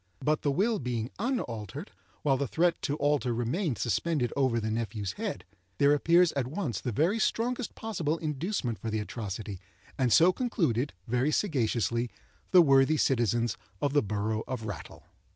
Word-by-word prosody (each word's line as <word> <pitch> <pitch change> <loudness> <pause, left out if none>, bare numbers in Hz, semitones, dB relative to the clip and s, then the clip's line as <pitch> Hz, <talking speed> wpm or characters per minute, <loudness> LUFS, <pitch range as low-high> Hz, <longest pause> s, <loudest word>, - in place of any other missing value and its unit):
But 150 +1 +1
the 145 - +1
will 210 +10 +1
being 120 -2 -3
unaltered, 120 - -3 0.3
while 140 -2 +3
the 140 +1 -1
threat 170 +6 +1
to 145 - -1
alter 145 -5 +1
remained 125 - -1
suspended 130 +1 0
over 130 -4 +2
the 110 0 -2
nephew's 110 -3 -2
head, - - -5 0.3
there 140 +1 +5
appears 170 +4 +4
at 135 -3 -2
once 140 - -3
the 125 - -2
very 170 - +1
strongest 240 +2 -1
possible 170 -8 -2
inducement 150 - -2
for 115 - -4
the 110 - -1
atrocity, 105 -2 -5 0.4
and 125 -3 +2
so 175 +8 +6
concluded, 160 - 0
very 125 +5 +1
sagaciously, 120 - 0 0.4
the 180 -2 +7
worthy 135 +1 +5
citizens 120 -4 +1 0.2
of 140 -1 0
the 145 - +4
borough 110 +1 -2
of 125 -4 -4
Rattle. 105 - -7
135 Hz, 160 wpm, -29 LUFS, 115-165 Hz, 0.4 s, the